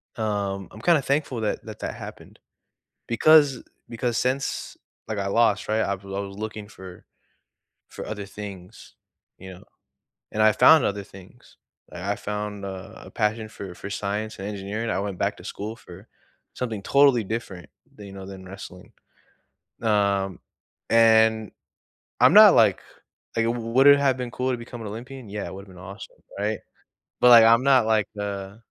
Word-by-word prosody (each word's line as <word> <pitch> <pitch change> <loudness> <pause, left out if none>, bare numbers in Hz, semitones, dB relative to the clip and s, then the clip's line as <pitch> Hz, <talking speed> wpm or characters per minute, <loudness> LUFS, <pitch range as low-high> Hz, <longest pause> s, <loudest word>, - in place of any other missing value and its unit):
um, 100 -3 -2
I'm 110 - -12
kinda 165 -5 +3
thankful 135 -3 -1
that 105 - -2
that, - - -9
that - - -4
happened - - -11 0.7
because, 145 +2 +5
eh - - -14 0.3
because 115 0 -2
since, 130 +2 -2 0.3
like, 110 -2 -3
I 100 - -2
lost, 105 -2 +2
right? 110 +1 +1
I 100 - -1
was 100 0 -13
I 95 0 -5
was 100 -1 -7
looking 105 0 -6
for 95 -3 -12 0.8
for - - -9
other 105 -2 -6
things, 100 -1 -10 0.4
you 95 0 -10
know, 90 - -14 0.7
and 110 - 0
I 110 - +6
found 145 +8 +6
other 100 0 -1
things. 100 +5 -17 0.3
Like, 90 - -9
I 100 +2 -1
found 105 -1 -5
a 95 +1 -8
a - - -12
passion 110 0 -1
for 95 -4 -9
for 100 - -8
science 105 +1 -4
and 95 +1 -5
engineering. 105 +3 -4
I 90 - -1
went 100 -2 -4
back - - -1
to - - -13
school 105 +2 -6
for 95 0 -14 0.5
something 110 -5 -4
totally 140 -4 +4
different 95 -6 -6 0.3
than 105 -1 -11
you 100 - -11
know, 95 -1 -9
than 95 -1 -10
wrestling. 90 -1 -11 0.9
Um, 100 -3 +1 0.5
and 110 -1 +4 0.7
I'm - - +6
not, - - +9
like - - +4 0.5
like, 115 0 +1
"W 120 +1 -1
would 135 +3 +5
it 140 0 +8
have 135 -2 +2
been 125 -1 -5
cool 130 +2 -2
to 125 - -2
become 120 0 -9
an 110 - -6
Olympian?" 125 +3 -9
Yeah, 105 0 -5
it - - -8
would 95 - -8
have 95 - -15
been 90 - -12
awesome, 100 +2 -11 0.2
right? 105 +2 -1 0.6
But, 125 - +7
like, 115 -2 +9
I'm 115 +2 +5
not, 130 -4 +4
like, 110 -2 +2
uh 100 0 -5
105 Hz, 180 wpm, -24 LUFS, 100-115 Hz, 0.9 s, not